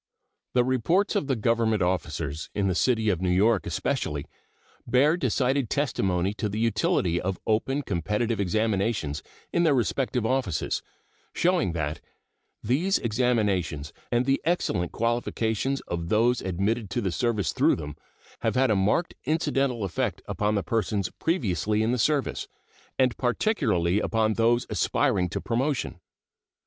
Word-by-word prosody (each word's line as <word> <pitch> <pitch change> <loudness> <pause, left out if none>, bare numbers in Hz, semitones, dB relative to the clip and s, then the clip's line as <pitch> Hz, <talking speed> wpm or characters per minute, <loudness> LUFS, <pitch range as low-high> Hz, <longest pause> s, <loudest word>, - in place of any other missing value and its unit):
The 125 - +5
reports 130 - +1
of 195 -9 0
the 135 - +1
Government 110 -2 +1
officers, 80 -4 -2
in 100 -2 +1
the 95 - +1
city 110 +2 +2
of 90 -4 0
New 95 - 0
York 100 +1 +3
especially, 75 -1 -2 0.6
bear 135 +6 +4
decided 135 - 0
testimony 95 -9 0
to 105 0 -2
the 105 - -4
utility 105 -6 +1
of 95 0 -2
open 135 +6 0
competitive 105 +5 -1
examinations 100 -6 0 0.3
in 170 - +3
their 160 -5 +4
respective 125 -1 0
offices, 125 - 0 0.5
showing 175 - +2
that 80 -2 -3 0.6
These 160 - +2
examinations 105 - 0 0.2
and 120 +1 +2
the 135 +1 +1
excellent 110 - 0
qualifications 120 +2 -1
of 85 -1 -4
those 120 +4 +3
admitted 100 +4 -1
to 120 +5 -1
the 95 -4 -1
service 105 +4 0
through - - +3
them 75 -2 -7 0.4
have - - -1
had 130 -2 +3
a - - +3
marked 105 - +1
incidental 140 -7 0
effect 95 -4 -2
upon 105 +1 -1
the 100 - 0
persons 100 -1 -1
previously 110 - 0
in 115 - +1
the 125 - 0
service, 145 +3 0 0.5
and 130 -2 +2
particularly 115 - +1
upon 110 0 +1
those 120 +2 +2
aspiring 90 -1 +1
to - - -3
promotion. 130 +3 -1
110 Hz, 140 wpm, -26 LUFS, 95-125 Hz, 0.6 s, The